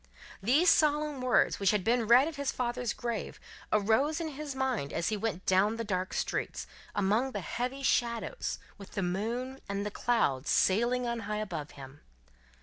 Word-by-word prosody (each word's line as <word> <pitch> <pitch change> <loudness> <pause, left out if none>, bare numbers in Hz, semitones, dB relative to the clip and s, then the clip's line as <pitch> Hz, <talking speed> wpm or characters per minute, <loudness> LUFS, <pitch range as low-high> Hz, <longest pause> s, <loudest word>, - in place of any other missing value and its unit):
These 285 - +5
solemn 300 -2 +2
words, 255 -1 +3
which 195 -1 +3
had 210 -2 +1
been 230 +2 +2
read 250 +5 +7
at 325 - -5
his 280 -1 -1
father's 245 -1 -2
grave, 235 -3 -4 0.3
arose 225 - +2
in 325 -1 -3
his 295 -1 -6
mind 260 - -1
as 165 - -1
he 215 - 0
went 205 -3 -3
down 195 +4 +3
the 230 - -2
dark 185 -3 -2
streets, - - -2 0.3
among 215 +7 +1
the - - -3
heavy 255 +3 -3
shadows, 235 - 0 0.2
with 200 - -11
the 195 - -1
moon 235 +9 -2
and 200 0 -2
the 210 - -3
clouds 165 - 0
sailing 240 +6 +3
on 235 -1 -2
high 210 - -1
above 170 -8 -4
him. 135 +1 -11
235 Hz, 175 wpm, -30 LUFS, 200-260 Hz, 0.3 s, read